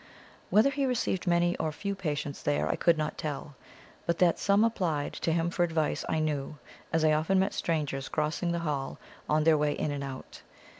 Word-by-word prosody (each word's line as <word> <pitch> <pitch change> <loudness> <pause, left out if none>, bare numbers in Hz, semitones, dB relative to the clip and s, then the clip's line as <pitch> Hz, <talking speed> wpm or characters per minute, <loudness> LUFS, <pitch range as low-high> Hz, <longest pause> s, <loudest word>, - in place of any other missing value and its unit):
Whether 220 +7 +5
he 280 -1 0
received 230 -7 -1
many 175 0 +3
or 160 -1 -1
few 200 +6 -3
patients 150 -6 -3
there 75 +1 0
I - - +1
could 170 -2 +3
not 155 0 -3
tell; 145 -1 -4 0.5
but 170 0 +1
that 175 -2 +3
some 200 +2 +3
applied 175 -10 0
to 165 - -1
him 165 +1 +1
for 175 - -2
advice 160 -3 0
I - - +1
knew, 150 -2 -2 0.3
as 160 -1 +2
I 155 - +5
often 160 +5 +2
met 190 +1 +2
strangers 145 -5 -2
crossing 155 +3 -1
the 170 - 0
hall 140 -3 -2 0.3
on 155 0 +3
their 155 -1 +5
way 150 0 +2
in 145 - -2
and 140 -1 -3
out. 135 -1 -8
160 Hz, 200 wpm, -29 LUFS, 150-175 Hz, 0.5 s, Whether